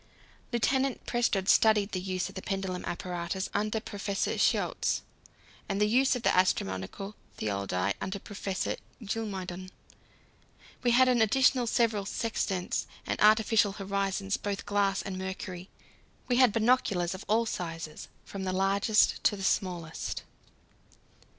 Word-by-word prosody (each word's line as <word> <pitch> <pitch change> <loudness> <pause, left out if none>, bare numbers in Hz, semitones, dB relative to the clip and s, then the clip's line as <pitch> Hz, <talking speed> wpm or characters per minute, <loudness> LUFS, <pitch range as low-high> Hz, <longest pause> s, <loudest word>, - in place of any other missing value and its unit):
Lieutenant 265 +2 +1
Prestrud 220 -5 +1
studied 215 -2 +4
the 185 - -2
use 185 -1 -2
of - - -10
the 190 - -6
pendulum 190 -2 -3
apparatus 180 +2 -3
under 215 +2 0
Professor 205 -2 -2
Schiotz - - +1 0.7
and 195 - -1
the 210 - +4
use 255 +5 +3
of 245 - -4
the - - +3
astronomical 180 - 0 0.2
theodolite 100 -2 -1
under 190 - -3
Professor 195 -1 -3 0.3
Geelmuyden. 190 -4 -4 1.1
We 245 - +2
had 255 +2 +6
in 245 -2 +3
addition 255 +2 +4
several 220 -4 +1
sextants 200 -5 -2 0.2
and - - -2
artificial 215 -1 +5
horizons, 195 0 -1
both 200 -1 -4
glass 200 -1 +1
and 190 -2 -5
mercury. 190 -1 -6 0.6
We 245 - +2
had 255 -3 +6
binoculars 215 -6 +2
of 190 - -7
all 225 +2 +3
sizes, 165 -6 -5 0.2
from 195 -1 -6
the 185 -1 -1
largest 200 +3 +3
to 210 - +4
the 195 - -7
smallest. 175 -4 -2
200 Hz, 130 wpm, -29 LUFS, 185-220 Hz, 1.1 s, had